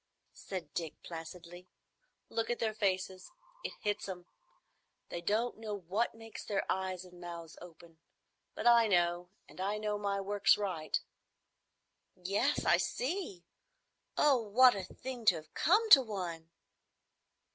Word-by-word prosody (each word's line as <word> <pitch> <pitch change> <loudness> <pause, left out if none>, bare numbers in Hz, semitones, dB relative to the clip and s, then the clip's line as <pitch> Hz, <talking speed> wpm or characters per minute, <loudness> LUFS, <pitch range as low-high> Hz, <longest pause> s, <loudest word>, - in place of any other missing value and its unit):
said 175 -7 -7
Dick, 165 -3 -3
placidly. 175 +2 -9 0.6
"Look 225 - -2
at 240 - 0
their 220 -1 -1
faces. 190 -3 -1 0.3
It - - -4
hits 205 -1 -2
'em. 180 -2 -6 0.8
They 170 - -4
don't 220 +6 0
know 215 -2 -4
what 200 +5 -1
makes 225 0 -9
their 200 -2 -1
eyes 185 -1 -2
and 180 -1 -14
mouths 170 -2 -8
open; 165 -1 -14 0.6
but - - -5
I 235 -1 +7
know. 175 -2 +2 0.2
And - - -10
I 200 +2 0
know 210 -1 -2
my 200 -1 -1
work's 200 +1 +3
right." 185 -7 -1 1.2
"Yes. 200 +10 0
I - - +5
see. 240 - -3 0.7
Oh, 290 -3 +5
what 245 +4 +6
a 195 - -4
thing 250 +4 -7
to 185 - +6
have 155 -1 -10
come 425 +6 +3
to 275 - +12
one!" 175 -8 -5
195 Hz, 140 wpm, -33 LUFS, 175-220 Hz, 1.2 s, to